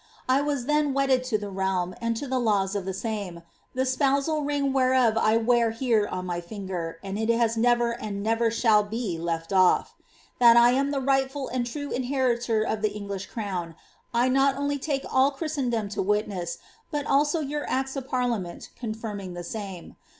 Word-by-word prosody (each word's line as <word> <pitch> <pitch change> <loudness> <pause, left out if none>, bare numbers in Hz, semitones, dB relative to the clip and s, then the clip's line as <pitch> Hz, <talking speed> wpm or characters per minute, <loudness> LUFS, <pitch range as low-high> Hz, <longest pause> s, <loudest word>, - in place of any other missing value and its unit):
I 260 +2 +3
was 285 -4 -1
then 295 -1 +1
wedded 270 -2 +2
to 240 -4 +1
tlie 205 -2 -7
realm, 190 -2 -1
and 230 -1 -1
to 285 - -4
the 260 0 0
laws 205 -4 +1
of 200 -2 -2
tlie 190 -1 -3
same, 195 -5 -4 0.3
the 260 +1 +1
spousal 280 +3 +1
ring 285 -2 0
whereof 255 -3 +3
I 225 0 +3
wear 235 0 +3
here 225 -2 +1
on 185 0 -4
my 175 -1 -3
finger, 175 -3 -5
and 195 +1 -4
it 220 +1 -1 0.3
never 240 +1 +3
has 235 - -6
and 200 -2 -4
never 225 +1 +2
shall 225 -2 +4
be 205 -4 -3
left 165 +1 -3
olf. 185 -1 +4 0.5
That 235 -1 +7
I 240 +1 +7
am 275 +2 +1
the 280 -1 -1
rightful 270 0 0
and 245 -1 -1
true 285 +3 -5
inheritor 245 -4 0
of 220 -1 -2
the 215 -1 +1
English 200 -1 -5
crown, 185 -7 -4 0.4
I 240 +1 +2
uot 270 +1 +3
only 285 0 -1
take 275 -1 -2
all 260 +1 +4
Christendom 270 -7 -2
to 205 - -2
witness, 195 -4 -1 0.3
but 290 -1 -2
also 295 +4 +2
your 295 0 -3
acts 265 +1 -1
of 265 -1 -5
parliament 235 -9 -2
con 220 -3 -3
finning 205 -5 -6
the 175 - -6
same. 195 -2 -7
235 Hz, 190 wpm, -26 LUFS, 200-265 Hz, 0.5 s, That